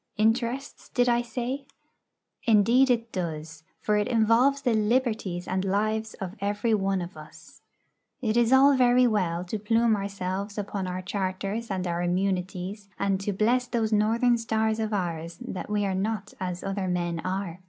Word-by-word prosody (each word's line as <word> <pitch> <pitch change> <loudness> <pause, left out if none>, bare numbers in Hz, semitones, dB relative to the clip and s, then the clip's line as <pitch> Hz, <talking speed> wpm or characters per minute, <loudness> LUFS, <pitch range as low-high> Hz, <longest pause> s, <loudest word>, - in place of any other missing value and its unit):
Interests, 235 +5 0
did 245 0 +2
I 240 0 +3
say? 250 +3 -4 0.8
Indeed 230 +5 +5
it 230 -2 +1
does, 160 -3 -5 0.2
for 210 0 +1
it 210 - +1
involves 245 +5 +3
the 245 -3 +2
liberties 215 -5 0
and 185 0 -1
lives 215 +3 -1
of 190 -2 -6
every 205 +3 0
one 195 -3 +1
of 175 +1 -9
us. 155 0 -14 0.6
It 225 -4 -1
is 240 0 +3
all 275 +1 +7
very 250 0 +5
well 180 -7 +1
to 210 +4 -4
plume 225 +2 +3
ourselves 200 0 -4
upon 200 -2 -3
our 185 0 -4
charters 195 +4 -3
and 190 -2 -2
our 170 0 -1
immunities, 185 +2 -2
and 195 -1 0
to 205 - -1
bless 240 +5 +1
those 225 -3 0
Northern 230 +3 +3
stars 220 -1 0
of 220 -1 -1
ours 170 -4 -3
that 185 - -6
we 210 -1 +1
are 195 - 0
not 205 +1 -2
as 180 -1 -4
other 195 -1 -2
men 175 -2 -1
are. 185 -1 -3
205 Hz, 165 wpm, -27 LUFS, 185-230 Hz, 0.8 s, all